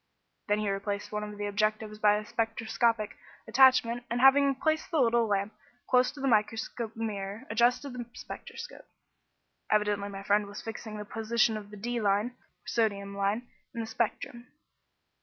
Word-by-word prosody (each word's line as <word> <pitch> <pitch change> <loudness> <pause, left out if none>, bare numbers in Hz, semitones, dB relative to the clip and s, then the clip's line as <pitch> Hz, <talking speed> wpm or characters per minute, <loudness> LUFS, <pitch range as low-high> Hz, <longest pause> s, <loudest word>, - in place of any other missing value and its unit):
Then 205 0 +2
he 210 -1 0
replaced 200 +1 -3
one 210 0 -2
of 210 0 -7
the 205 - -3
objectives 215 +1 -1
by 210 -1 +5
a 210 0 -3
spectroscopic 225 0 0 0.3
attachment, 245 -2 +5
and 235 - -1
having 275 +1 +6
placed 315 +3 0
the 325 - +1
little 235 -2 +3
lamp 200 0 0 0.3
close 250 0 +4
to 290 - -11
the 270 - -1
microscope 225 0 0
mirror, 210 0 -4
adjusted 245 +4 +2
the 245 -1 -5
spectroscope. 475 - -9 0.8
Evidently 210 -1 +1
my 195 0 -7
friend 205 +1 +2
was 205 +1 -8
fixing 220 -1 -6
the 210 - -6
position 225 +1 +1
of 210 -1 -7
the 210 - -10
"D" 240 +3 -2
line 205 +2 +2
(or 245 - -35
sodium 200 -3 0
line) 200 +5 -1 0.3
in 230 - -2
the - - -3
spectrum. 235 +2 -3
220 Hz, 165 wpm, -29 LUFS, 205-240 Hz, 0.8 s, having